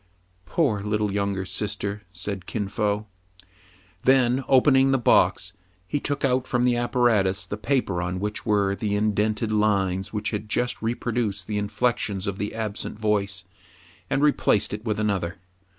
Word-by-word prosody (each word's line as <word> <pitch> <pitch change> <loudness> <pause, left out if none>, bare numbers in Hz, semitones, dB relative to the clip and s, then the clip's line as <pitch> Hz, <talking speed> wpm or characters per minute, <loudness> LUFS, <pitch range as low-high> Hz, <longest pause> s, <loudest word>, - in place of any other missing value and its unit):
" 90 0 -39
Poor 130 -12 +1
little 105 0 -1
younger 100 -2 -1
sister! 100 +1 -3
'* - - -37
said 95 -2 -3
Kin 105 -3 -2
Fo. 105 0 -1 1.0
Then, 130 0 +3
opening 135 0 +5
the 135 - +3
box, 120 - +3 0.3
he 145 - -1
took 145 0 -1
out 130 -1 +1
from 120 -1 +1
the 125 -1 +3
apparatus 120 -6 +2
the - - -4
paper 105 -6 0
on 90 +1 -2
which 105 +2 -3
were 100 -3 +2
the 100 +1 -1
indented 105 +1 0
lines 100 -3 +1
which 105 0 -2
had 105 0 -4
just 125 +2 0
reproduced 115 -4 -1
the 105 +1 -2
inflections 100 -2 -1
of 100 -2 -3
the 105 +1 -3
absent 110 -2 -4
voice, 100 -3 0 0.7
and 140 - +1
replaced 140 -9 +2
it 105 +1 -5
with 110 -2 -1
another. 100 -4 -1
105 Hz, 160 wpm, -25 LUFS, 100-120 Hz, 1.0 s, opening